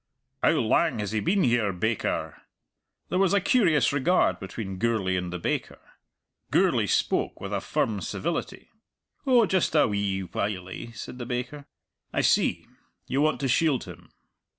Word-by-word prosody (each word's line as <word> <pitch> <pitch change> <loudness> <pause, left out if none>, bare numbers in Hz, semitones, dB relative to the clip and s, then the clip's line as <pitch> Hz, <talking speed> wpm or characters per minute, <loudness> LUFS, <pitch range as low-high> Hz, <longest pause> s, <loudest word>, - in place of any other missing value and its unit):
"How - - +4
lang - - +2
has 105 -1 -3
he 110 - 0
been 185 - +1
here, 120 -4 +2
baker?" 105 +5 -2 0.7
There 185 - 0
was 195 0 +3
a - - +5
curious 180 - +3
regard 160 +6 +2
between 95 -1 -6
Gourlay 105 -4 +1
and 90 -1 -3
the 90 - -3
baker. 85 - -3 0.7
Gourlay - - +2
spoke - - 0
with - - -6
a - - -1
firm 105 -3 -1
civility. 170 - -4 0.6
"Oh, 245 -4 +5
just 185 -4 0
a 150 - +5
wee 100 -2 -1
whilie," 95 +4 -4
said 115 +4 -8
the 120 - -5
baker. 125 +4 -4 0.4
"I - - 0
see. - - +2 0.4
You 135 - 0
want 155 0 +1
to 135 - 0
shield 140 0 +2
him. 85 -2 -12
115 Hz, 155 wpm, -26 LUFS, 95-155 Hz, 0.7 s, a